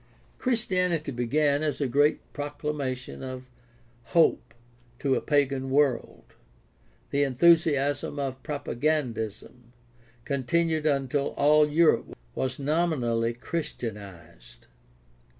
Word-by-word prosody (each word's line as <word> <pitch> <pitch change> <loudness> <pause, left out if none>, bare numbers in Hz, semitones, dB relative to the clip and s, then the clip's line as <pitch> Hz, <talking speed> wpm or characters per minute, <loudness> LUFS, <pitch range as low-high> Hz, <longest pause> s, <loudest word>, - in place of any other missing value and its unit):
— - - -33
Christianity 180 - 0
began 140 +4 +1
as 155 -2 -1
a 145 - 0
great 145 +4 +1
proclamation 145 -3 -4
of 130 -1 -7 0.7
hop'e 170 -2 +5 0.6
to 135 +1 0
a - - +1
pagan 135 -3 0
world. 135 -3 +1 0.9
The 140 - +1
enthusiasm 145 0 +3
of 135 -2 -3
propagandism 125 -5 -3 0.5
continued 155 +3 0
until 140 -1 0
all 150 +1 +5
Europe 165 +2 +2 0.2
was 130 0 -2
nominally 135 -7 0
Christianized. 100 - -7
140 Hz, 95 wpm, -27 LUFS, 125-155 Hz, 0.9 s, hop'e